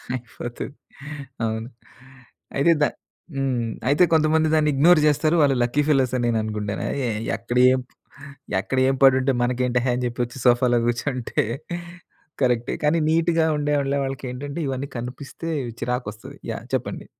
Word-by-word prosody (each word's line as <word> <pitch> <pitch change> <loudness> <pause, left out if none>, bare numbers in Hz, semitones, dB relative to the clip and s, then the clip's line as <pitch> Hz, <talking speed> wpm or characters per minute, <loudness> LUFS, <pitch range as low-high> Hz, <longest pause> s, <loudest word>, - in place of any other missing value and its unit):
అయిపోతది. 120 +2 -7 0.7
అవును. 110 +1 -3 0.9
అయితే 140 +5 +4
ద - - +6 0.5
హ్మ్. 130 -4 -1 0.2
అయితే 145 +5 +5
కొంతమంది 160 0 +3
దాన్ని 155 -1 +3
ఇగ్నోర్ 160 +5 +6
జేస్తారు. 155 +2 +3
వాళ్ళు 140 -2 +4
లక్కీ 120 +5 +1
ఫెలోస్ 135 -4 +2
అని 120 -1 0
నేననుకుంటాను. 105 -2 -2 0.2
ఎ - - 0 0.3
ఎక్కడ 120 +1 -3
ఏం, 130 - +2 0.8
ఎక్కడ 115 +7 -3
ఏం 135 - +1
పడుంటే 135 0 +5
మనకేంటేహే 125 0 +1
అని 125 - -2
చేపొచ్చి 120 +1 -3
సోఫాలో 120 0 +4
కూర్చుంటే 120 +1 -1 1.0
కరెక్టే 125 -1 +1
కానీ 150 +3 +3
నీట్‌గా 165 0 +2
ఉండే 145 0 0 0.3
వాళ్ళకేంటంటే 135 +2 -5
ఇవన్నీ 135 +1 -3
కనిపిస్తే 130 +7 -6 0.3
చిరాకొస్తది 125 -4 -4
యాహ్! - - -6
చెప్పండి. - - -2
130 Hz, 125 wpm, -23 LUFS, 120-145 Hz, 1.0 s, ద